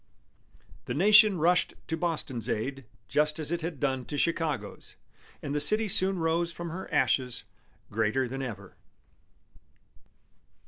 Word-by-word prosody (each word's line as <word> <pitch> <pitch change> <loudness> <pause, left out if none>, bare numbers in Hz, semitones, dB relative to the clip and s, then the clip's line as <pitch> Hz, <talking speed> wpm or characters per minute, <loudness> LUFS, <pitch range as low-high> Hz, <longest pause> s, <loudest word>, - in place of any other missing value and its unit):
The - - -3
nation 210 +3 +6
rushed 175 +3 +2
to 160 - -2
Boston's 150 - -2
aid 130 +4 -2 0.2
just 150 +1 +1
as 155 -1 -3
it 170 0 -1
had 160 -3 -4
done 130 -3 0
to 145 - -4
Chicago's, 150 -10 -2 0.5
and 145 - -3
the 150 - 0
city 215 +7 +3
soon 190 0 +2
rose 165 +1 +1
from 170 -1 -6
her 185 +3 -7
ashes 125 -2 +1 0.5
greater 110 +5 +1
than 135 +2 -5
ever. 105 -7 -7
150 Hz, 135 wpm, -29 LUFS, 130-170 Hz, 0.5 s, nation